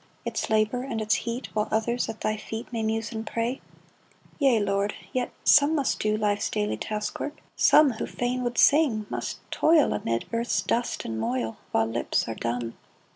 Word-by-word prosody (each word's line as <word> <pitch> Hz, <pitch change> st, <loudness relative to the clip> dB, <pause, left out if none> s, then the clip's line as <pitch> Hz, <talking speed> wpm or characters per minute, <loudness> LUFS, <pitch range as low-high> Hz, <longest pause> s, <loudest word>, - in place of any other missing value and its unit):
Its -, -, -2 dB
labor 220 Hz, +3 st, +2 dB
and 255 Hz, -4 st, -3 dB
its 215 Hz, 0 st, +1 dB
heat, 235 Hz, +2 st, -2 dB
While 210 Hz, 0 st, 0 dB
others 235 Hz, +2 st, 0 dB
at 225 Hz, -, -7 dB
thy 215 Hz, -, 0 dB
feet 220 Hz, +2 st, -7 dB
May 230 Hz, -, -1 dB
muse 220 Hz, 0 st, -1 dB
and 220 Hz, -1 st, -4 dB
pray! 230 Hz, +4 st, -2 dB, 0.8 s
Yea, 265 Hz, -6 st, +4 dB
Lord! 200 Hz, 0 st, 0 dB
— 190 Hz, -, -25 dB
Yet 250 Hz, -1 st, -1 dB
some 290 Hz, +2 st, +6 dB
must 280 Hz, -3 st, 0 dB
do 215 Hz, 0 st, +1 dB
Life's 205 Hz, -1 st, 0 dB
"daily 210 Hz, -1 st, -1 dB
task 210 Hz, -1 st, -4 dB
work; 295 Hz, -, -4 dB, 0.2 s
some 300 Hz, -3 st, +6 dB
Who 220 Hz, -, -4 dB
fain 245 Hz, +1 st, -2 dB
would 240 Hz, 0 st, -2 dB
sing, 275 Hz, -8 st, +4 dB
must -, -, -3 dB
toil 315 Hz, -2 st, +4 dB
Amid 115 Hz, 0 st, -1 dB
earth's 235 Hz, +1 st, 0 dB
dust 240 Hz, +1 st, -1 dB
and 110 Hz, -1 st, -3 dB
moil, 115 Hz, 0 st, -2 dB
While 110 Hz, -, +2 dB
lips 115 Hz, +1 st, -1 dB
are 115 Hz, -, -2 dB
dumb 115 Hz, +1 st, -3 dB
220 Hz, 185 wpm, -26 LUFS, 205-245 Hz, 0.8 s, some